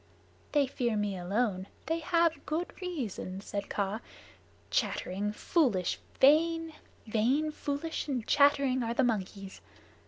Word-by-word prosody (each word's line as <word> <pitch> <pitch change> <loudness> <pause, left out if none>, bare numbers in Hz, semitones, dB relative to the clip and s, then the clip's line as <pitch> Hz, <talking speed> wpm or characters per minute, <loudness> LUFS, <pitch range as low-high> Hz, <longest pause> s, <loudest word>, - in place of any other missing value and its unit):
"They 290 -2 +4
fear 240 -4 -1
me 205 -1 -1
alone. 190 +1 -1 0.2
They 325 +1 0
have 335 0 +2
good 325 +3 -2
reason," 240 - -4
said 200 0 -5
Kaa. 200 +1 -1 0.7
"Chattering, 200 +3 0
foolish, 210 - +1 0.2
vain 325 +3 +4 0.3
vain, 250 +8 +1
foolish, 300 +2 -3
and 250 -6 -2
chattering, 280 -3 +4
are 230 0 -2
the 265 - +3
monkeys. 195 -4 -2
250 Hz, 120 wpm, -31 LUFS, 205-305 Hz, 0.7 s, They